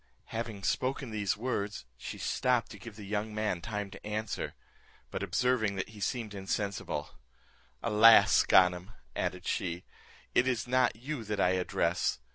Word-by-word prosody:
Having 110 -3 -4
spoken 130 +3 -1
these 105 -1 0
words, 105 - -3
she 65 - -7
stopped 125 -2 +1
to 105 - -10
give 115 0 -10
the 105 -2 -9
young 105 +1 -2
man 105 -5 -1
time 105 0 -4
to - - -11
answer, 105 +1 -3 0.6
but - - -3
observing 110 +2 +1
that 95 - -3
he 110 -1 -12
seemed 110 0 -2
insensible; 100 0 -3 0.6
"Alas! 115 0 +7
Ganem," 90 +2 +4 0.2
added 90 0 -2
she, 85 -1 -2 0.5
"it 125 - +4
is 125 -3 0
not 125 -2 +2
you 130 +2 -5
that 105 -1 -2
I 90 - +4
address! 90 -1 0
105 Hz, 150 wpm, -31 LUFS, 100-115 Hz, 0.6 s, Alas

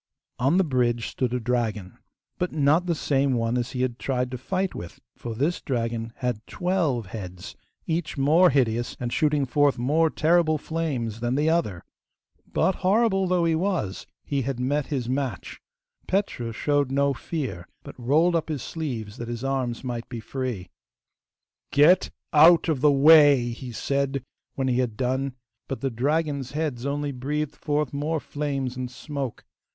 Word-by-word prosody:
On 135 +8 +3
the 190 - +5
bridge 120 -6 0
stood 125 -2 -2
a 125 - 0
dragon, 110 -5 -2 0.4
but 180 - -1
not 155 +4 +2
the 170 - +1
same 140 -2 +1
one 115 0 0
as 120 0 -2
he 125 -1 -1
had 125 -1 -2
tried 125 -2 -1
to 125 - -4
fight 185 +7 -1
with, 85 - -8 0.2
for 115 -2 -6
this 150 +9 0
dragon 115 -3 -2
had 125 -4 -2
twelve 170 - 0
heads, 90 -3 -8 0.3
each 160 -2 -2
more 160 +7 +5
hideous 120 -3 0
and 120 -1 -3
shooting 150 -2 +2
forth 145 +2 +2
more 150 +7 +2
terrible 160 0 +3
flames 140 -9 -3
than 120 +2 -1
the 150 +3 +2
other. 105 - 0 0.7
But, 190 - +1
horrible 195 0 +3
though 180 -1 +2
he 165 - +2
was, 165 - -1 0.2
he 140 -1 -1
had 130 0 -3
met 140 +3 0
his 130 -6 -2
match. 130 0 -3 0.5
Petru 185 - -1
showed 145 +3 +1
no 140 0 +2
fear, 130 - -5 0.2
but - - -9
rolled 155 +8 +3
up 160 -1 -1
his 145 -6 -3
sleeves, 120 -10 -5
that 120 - -6
his 120 +1 -5
arms 130 -3 -2
might 120 -2 -4
be 120 - -5
free. 110 -6 -4 1.0
'Get 160 +6 +5 0.2
out 165 +3 +7
of 155 -6 0
the 150 0 +6
way!' 140 -3 +6
he 125 +1 -7
said 140 +2 -1 0.3
when 135 -1 -1
he 125 -1 +1
had 120 -4 -1
done, 130 +1 -1 0.3
but 135 - -5
the 135 -1 -1
dragon's 140 +2 -1
heads 145 -5 -2
only 145 0 -2
breathed 145 +3 -3
forth 150 -3 -1
more 150 +3 -1
flames 140 -4 -3
and 130 -1 -4
smoke. 135 -1 -6
135 Hz, 165 wpm, -25 LUFS, 120-155 Hz, 1.0 s, out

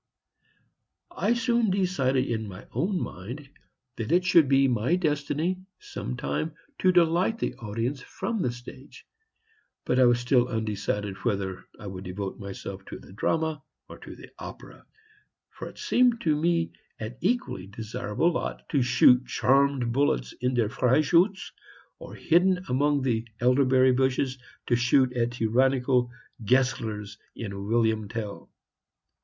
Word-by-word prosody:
I 225 +4 +1
soon 235 -2 +1
decided 175 -9 +1
in 110 -3 -3
my 95 0 -10
own 190 +1 -1
mind 125 - -7 0.5
that 115 +4 -4
it 180 +2 +3
should 170 -6 +5
be 135 0 +4
my 125 +6 +1
destiny, 155 +2 -1 0.2
some 410 - -6
time, 155 +4 -3 0.2
to 185 - +4
delight 175 +5 +3
the - - -2
audience 115 +5 -3
from 225 - -4
the 125 - 0
stage, 125 +3 -12 0.8
but 125 - +1
I 130 - +7
was 120 0 +4
still 125 0 +2
undecided 105 -3 -2
whether 95 -3 -3
I - - -10
would 95 -1 -7
devote 95 +1 -5
myself 100 -1 -7
to - - -8
the - - -15
drama 160 +7 -1 0.3
or - - -11
the - - -12
opera, - - -11 0.6
for - - -8
it - - -16
seemed 245 -2 +2
to 155 -2 +2
me 165 +2 +1 0.3
an 110 +3 -6
equally 190 - -1
desirable 110 - -2
lot - - -4
to 140 - +2
shoot 125 0 +5
charmed 135 -2 +2
bullets 115 - +1
in 125 +1 0
"Der 115 -4 +1
Freischutz," 155 - +2 0.5
or, - - -10
hidden 180 +3 +3
behind 130 -4 +1
elderberry 130 +1 +4
bushes, 130 0 0 0.3
to 120 - +2
shoot 125 +1 +3
at 120 -1 0
tyrannical 125 +2 +2 0.3
Geslers 110 -4 0 0.2
in 100 -3 -6
"William 110 -2 +1
Tell." 105 -2 -6
130 Hz, 140 wpm, -27 LUFS, 110-160 Hz, 0.8 s, I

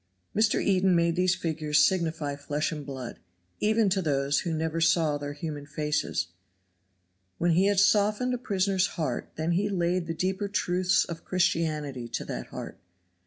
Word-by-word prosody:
Mr. 215 +1 +3
Eden 190 -2 +3
made 170 0 +2
these 180 +1 +2
figures 155 -4 -1
signify 160 -5 -1
flesh 145 +2 -2
and 150 -2 -5
blood, 130 -3 -6 0.4
even 220 0 +3
to 190 0 +1
those 140 -3 +1
who 170 - -3
never 160 +1 -1
saw 165 -2 +3
their 145 0 -5
human 145 -1 -6
faces. 150 - -1 1.1
When 175 0 +2
he 185 +4 +4
had 200 -1 +3
softened 210 +4 +3
a 250 - -2
prisoner's 195 -4 +1
heart 150 -7 -3
then 160 +2 -1
he 195 +4 +1
laid 175 -2 0
the 165 - -3
deeper 190 +3 -1
truths 185 -2 +1
of 170 -1 -7
Christianity 155 -8 -1
to - - -4
that - - -5
heart. - - -8
170 Hz, 165 wpm, -27 LUFS, 150-190 Hz, 1.1 s, he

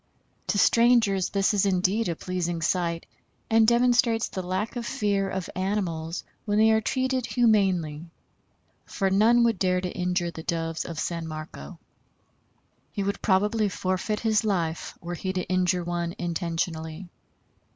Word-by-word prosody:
To - - 0
strangers 230 -4 +4
this 195 +1 +1
is 205 -1 +2
indeed 195 +2 +1
a 170 - -1
pleasing 175 -2 -3
sight, 170 -1 0 0.5
and 225 0 +5
demonstrates 235 -1 +3
the 190 - -4
lack 185 +6 -3
of 240 - -3
fear 205 -6 0
of 190 -3 -4
animals 180 -4 -2 0.2
when 205 -1 0
they 220 +1 +5
are 220 0 +3
treated 260 +1 -1
humanely, 190 -9 +1 0.8
for 195 -1 -1
none 225 +5 +5
would 230 -5 +2
dare 180 -1 +2
to 180 -1 -5
injure 180 -1 -1
the 160 - -8
doves 165 0 -2
of 170 - -6
San 170 0 -3
Marco. 155 - -8 1.1
He 200 - -3
would 200 +1 -2
probably 210 +2 +2
forfeit 185 +3 -2
his 220 -2 +2
life 170 -6 -2
were 175 +1 -5
he 185 +2 -3
to 185 -1 -1
injure 180 -1 +1
one 170 0 -3
intentionally. 165 0 -3
190 Hz, 150 wpm, -26 LUFS, 170-215 Hz, 1.1 s, and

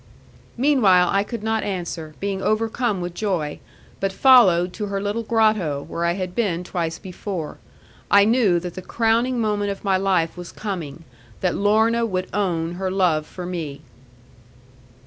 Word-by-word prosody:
Meanwhile 220 -10 +4
I 195 - +3
could 215 +1 -6
not 220 0 0
answer, 170 -5 -5
being 195 -1 -2
overcome 220 -1 0
with 175 0 -4
joy, 175 -8 -2 0.4
but 195 0 0
followed 190 -8 +5
to 210 +1 -4
her 200 0 -2
little 205 +3 -2
grotto, 215 -11 +1
where 170 - -3
I 170 - +2
had 185 -1 -4
been 180 -7 -1
twice 170 -2 -3
before. 185 -4 -6 0.5
I 200 0 +6
knew 220 -6 +3
that 175 -1 -6
the 185 - -7
crowning 230 +5 +1
moment 210 -2 0
of 195 - -5
my 195 -2 +2
life 185 -4 +1
was 175 -1 -8
coming 170 -7 -6 0.4
that 180 -2 +1
Lorna 220 +3 +2
would 185 -5 -2
own 170 -5 -1
her 190 - 0
love 175 -5 +1
for 180 - -8
me. 165 -6 -5
195 Hz, 160 wpm, -22 LUFS, 175-215 Hz, 0.5 s, I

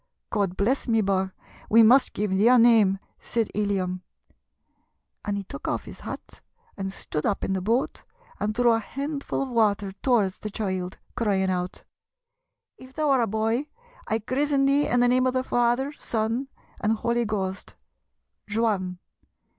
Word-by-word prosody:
'God 200 -4 0
bless 250 +9 +1
me, 225 -2 +3
bogh, 190 -1 0 0.4
we 230 +1 +7
mus' 250 +4 +6
give 205 -1 -2
thee 195 +4 +3
a 250 +1 +7
name!' 225 -5 +5 0.2
said 230 -2 -1
Illiam. 190 -3 -1 1.2
And 205 -1 -2
he 200 - -4
took - - -8
off - - -1
his - - -10
hat, - - -9 0.3
and 195 -1 -4
stood 150 -5 -4
up 200 - -1
in 195 - 0
the 190 - -1
boat, 230 +7 0 0.4
and 210 +1 -1
threw 240 0 +4
a 225 - +3
handful 280 +4 -3
of 270 - -5
water 210 -4 +1
towards 200 -2 +1
the 215 - -5
child, 185 -3 -3 0.2
crying 195 -4 +1
out: 180 0 -3 1.0
'If 260 +1 -14
thou 305 -2 +1
are 265 -2 +4
a 230 - +1
boy, 225 +6 0 0.4
I 220 - +1
chrizzen 275 +5 +1
thee 280 +1 +3
in 245 - +2
the 245 - +5
name 255 +1 +3
of 255 - 0
the 255 - +1
Father, 245 +3 +1
Son, 230 +1 -2 0.3
and 215 +1 +1
Holy 235 +2 0
Ghost, 195 -3 -3 0.8
Juan! 205 -5 0
220 Hz, 165 wpm, -25 LUFS, 195-245 Hz, 1.2 s, we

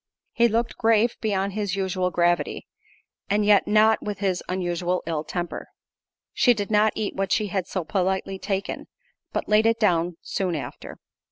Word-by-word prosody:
He 235 - +3
looked 230 +2 -1
grave 225 0 +3
beyond 200 -2 -1
his 205 -2 -2
usual 185 -1 -1
gravity, 175 0 0 0.6
and 205 +1 +2
yet 205 -2 +4
not 215 +1 +4
with 205 -2 -4
his 190 -3 -1
usual 180 0 -1
ill 160 -2 -2
temper. 175 +2 -5 0.7
She 245 -2 +4
did 205 0 -4
not 210 0 +4
eat 215 -2 -2
what 195 -1 -2
she 210 -1 +1
had 190 -1 -2
so 185 - -3
politely 190 0 -1
taken, 195 0 -3 0.4
but - - -3
laid 215 +1 +4
it 230 0 +2
down 175 -5 +1
soon 185 -3 -2
after. 150 - -7
195 Hz, 165 wpm, -24 LUFS, 180-215 Hz, 0.7 s, yet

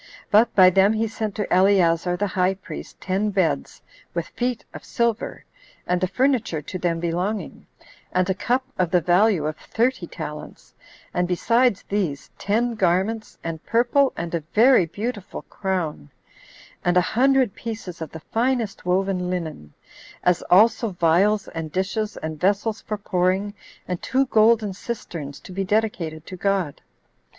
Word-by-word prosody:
But 220 +3 +4
by 185 -2 +8
them 195 +3 +4
he 220 +1 0
sent 220 -2 -4
to 210 -3 -2
Eleazar 180 -2 +3
the 205 - 0
high 185 0 +1
priest 190 - -9
ten 195 +3 -1
beds, 185 - -1 0.3
with 170 -2 -2
feet 245 -1 -3
of - - -9
silver, 235 -2 -2 0.4
and 180 0 0
the 185 - +2
furniture 235 - +1
to 165 +5 -7
them 170 -1 0
belonging, 180 +5 -3 0.4
and 185 0 +1
a 190 - +1
cup 250 +7 0 0.2
of 180 -2 +2
the 180 0 +3
value 180 0 +3
of 155 0 -2
thirty 235 -5 -1
talents; 150 -1 -8 0.4
and 180 0 +1
besides 230 +5 +2
these, 185 -9 -2
ten 235 +4 0
garments, 200 +3 0
and 165 -1 -5
purple, 245 +4 +3
and 170 0 -4
a 170 - +1 0.2
very 230 -5 +6
beautiful 205 +3 -5
crown, 175 - -3 0.7
and 175 0 +2
a - - +6
hundred 260 +1 +2
pieces 210 -7 -7
of 160 - -4
the 160 - -10
finest 230 -4 -1
woven 185 0 0
linen; 160 - -5 0.5
as 180 -1 +3
also 220 +4 +5
vials 185 +4 +2
and 165 -2 -6
dishes, 205 +4 -2
and 155 -1 -5
vessels 205 +3 +1
for 215 - -4
pouring, 190 +1 0 0.3
and 180 -1 -3
two 270 +1 +1
golden 220 -3 +3
cisterns 165 - -6
to - - -12
be 195 +2 -2
dedicated 185 -7 -1
to 185 - -8
God. 185 -5 -1
190 Hz, 155 wpm, -23 LUFS, 175-220 Hz, 0.7 s, by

